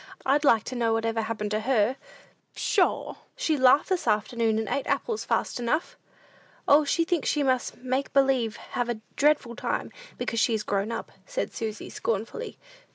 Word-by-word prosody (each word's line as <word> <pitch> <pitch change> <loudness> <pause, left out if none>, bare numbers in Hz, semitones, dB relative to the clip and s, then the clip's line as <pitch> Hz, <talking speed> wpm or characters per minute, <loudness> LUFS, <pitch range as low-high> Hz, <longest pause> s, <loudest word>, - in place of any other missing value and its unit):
"I'd 285 +3 +3
like 230 -7 +5
to 255 - -6
know 230 -2 +1
what 225 0 0
ever 225 0 0
happened 215 -1 -3
to 215 - +1
her? 230 0 +2 0.6
Pshaw! - - +1 0.2
She 315 - +1
laughed 260 +1 +5
this 370 -2 -1
afternoon, 220 +1 +1
and 220 -1 -1
ate 280 +6 -2
apples 450 -2 -1
fast - - -1
enough!" 245 +7 -1 0.7
"O, 290 +2 +6
she 330 +3 +1
thinks 340 -3 0
she 295 - +1
must 260 -2 0
make 260 +2 -2
believe 265 -5 +2 0.2
have 245 -1 -1
a 225 -2 -3
dreadful 290 -5 +2
time, - - -3 0.3
because 230 - -2
she 230 0 +3
is 210 - -2
grown 200 +2 -1
up," - - -5 0.2
said - - -3
Susy, 220 -3 -4
scornfully. 230 - -3
245 Hz, 175 wpm, -27 LUFS, 225-280 Hz, 0.7 s, O